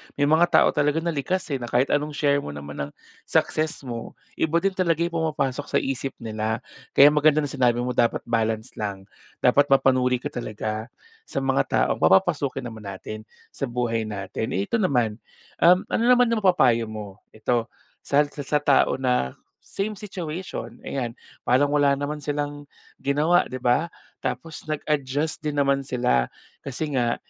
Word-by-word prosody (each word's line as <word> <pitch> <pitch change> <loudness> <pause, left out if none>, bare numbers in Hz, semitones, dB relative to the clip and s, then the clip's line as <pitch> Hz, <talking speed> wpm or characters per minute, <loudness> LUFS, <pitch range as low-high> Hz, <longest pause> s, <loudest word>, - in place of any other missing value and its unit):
May 145 - 0
mga 160 +4 +4
tao - - +5
talaga 150 +2 +1
na 170 - 0
likas, 170 +6 -1
eh, 135 - -1
na 120 - -5
kahit 125 +3 +1
anong 150 0 0
share 145 -1 +2
mo 75 - -7
naman 70 0 -8
ng - - -12 0.4
success 155 -1 0
mo. 120 -2 -6 0.2
Iba 170 +2 +1
din 195 - +3
talaga 170 -3 +1
'yong 170 - -1
pumapasok 150 -4 -1
sa - - -4
isip 135 0 -3
nila. 110 0 -2 0.3
Kaya 145 +2 +8
maganda 150 0 +4
na 145 - -3
sinabi 120 -3 +2
mo 125 - -1
dapat 120 -1 +1
balance 115 0 -1
lang. 100 -2 -4 0.4
Dapat 140 +3 +5
mapanuri 130 -2 +3
ka - - -3
talaga 110 -1 -4 0.4
sa 135 - -3
mga 135 0 +2
taong - - +1
papapasukin 135 - +3
naman 110 -4 -8
natin 110 +3 -7 0.2
sa 140 - -3
buhay 120 -2 -1
natin. 100 +1 -4
Eh, 95 - +1
ito - - 0
naman, 120 - +1 0.4
um, 180 +2 +6
ano - - +1
naman 245 -1 +5
'yong 230 - +2
mapapayo 125 - +3
mo? 110 0 -6 0.3
Ito 115 +2 0 0.4
sa 145 +1 +4
sa 145 -1 -7
sa 150 +1 +2
tao 140 -2 +4
na 125 - +1 0.2
same 205 +1 -4
situation, 180 -3 -6
ayan. 120 -3 -3 0.2
Parang 140 +4 +2
wala 140 -1 +4
naman 145 +1 -3
silang 145 0 -4 0.3
ginawa, 150 +5 +3
'di 130 - -4
ba? 125 +7 +3 0.3
Tapos 165 -1 -4
nag-adjust 150 0 -1
din 150 -2 -3
naman 140 -1 +2
sila. 65 - +1 0.3
Kasi 140 +2 -4
nga 120 -2 +1
140 Hz, 170 wpm, -24 LUFS, 120-150 Hz, 0.4 s, Kaya